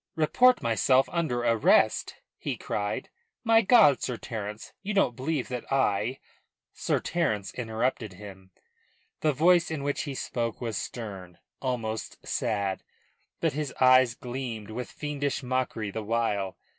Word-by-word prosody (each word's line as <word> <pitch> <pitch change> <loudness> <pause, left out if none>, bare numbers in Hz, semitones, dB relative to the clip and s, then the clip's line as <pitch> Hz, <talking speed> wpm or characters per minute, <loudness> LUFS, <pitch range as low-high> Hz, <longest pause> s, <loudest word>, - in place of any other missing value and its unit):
"Report 245 +11 +4
myself 130 +3 +3
under 160 -8 0
arrest?" 115 -2 +3 0.2
he - - -3
cried. 105 0 -3 0.3
"My 225 0 +5
God, 190 - +6
Sir 125 - -2
Terence, 105 -1 -6
you 205 +1 -3
don't 125 -11 +3
believe 135 +1 -2
that 125 0 -5
I 125 -2 +1 0.3
" - - -52 0.2
Sir - - 0
Terence 110 - -1
interrupted 115 -2 -2
him. 95 -1 -11 0.7
The 155 - +2
voice 170 +5 +4
in 155 -3 -3
which 145 0 -1
he 140 -2 -5
spoke 115 -2 -3
was 115 -3 -3
stern, 95 -7 -6 0.2
almost 115 -4 -3
sad; 100 -3 -1 0.6
but - - +1
his 150 0 -3
eyes 130 -2 +6
gleamed 120 -5 -5
with 125 +3 -5
fiendish 145 -2 -3
mockery 125 -5 -2
the 110 - -4
while. 105 -3 -1
125 Hz, 140 wpm, -28 LUFS, 110-140 Hz, 0.7 s, God